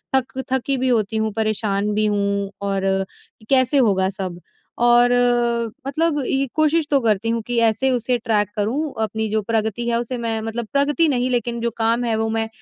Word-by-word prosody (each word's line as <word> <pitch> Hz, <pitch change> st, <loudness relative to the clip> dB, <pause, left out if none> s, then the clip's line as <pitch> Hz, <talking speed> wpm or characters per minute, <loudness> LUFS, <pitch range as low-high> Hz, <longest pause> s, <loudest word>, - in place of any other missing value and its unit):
थक 265 Hz, 0 st, -1 dB
थकी 265 Hz, +1 st, 0 dB
भी 260 Hz, 0 st, 0 dB
होती 220 Hz, -2 st, +1 dB
हूँ, 220 Hz, 0 st, 0 dB
परेशान 210 Hz, -1 st, -1 dB
भी 215 Hz, 0 st, +2 dB
हूँ 200 Hz, -1 st, -1 dB
और 195 Hz, -1 st, 0 dB, 0.4 s
कैसे 260 Hz, +1 st, +3 dB
होगा 190 Hz, -6 st, +2 dB
सब 185 Hz, -3 st, -6 dB, 0.4 s
और 240 Hz, 0 st, +5 dB, 0.8 s
मतलब 310 Hz, +2 st, 0 dB
ये 275 Hz, 0 st, 0 dB
कोशिश 310 Hz, 0 st, +2 dB
तो 280 Hz, -, +4 dB
करती 220 Hz, -1 st, +1 dB
हूँ 230 Hz, 0 st, 0 dB
कि, 245 Hz, -1 st, -2 dB
ऐसे 230 Hz, +4 st, +2 dB
उसे 245 Hz, 0 st, 0 dB
ट्रैक 215 Hz, -4 st, 0 dB
करूँ 265 Hz, +9 st, -1 dB
अपनी 220 Hz, +1 st, -2 dB
जो 215 Hz, +1 st, 0 dB
प्रगति 220 Hz, +1 st, -1 dB
है 235 Hz, 0 st, +1 dB
उसे 245 Hz, +1 st, -4 dB
मैं 225 Hz, -1 st, -2 dB
मतलब 225 Hz, +1 st, -4 dB
प्रगति 290 Hz, +4 st, +2 dB
नहीं 255 Hz, -2 st, 0 dB
लेकिन 240 Hz, -1 st, -1 dB
जो 235 Hz, 0 st, -1 dB
काम 230 Hz, +2 st, +1 dB
है 230 Hz, -2 st, 0 dB
वो 220 Hz, 0 st, 0 dB
मैं 225 Hz, 0 st, -1 dB
230 Hz, 185 wpm, -21 LUFS, 210-255 Hz, 0.8 s, और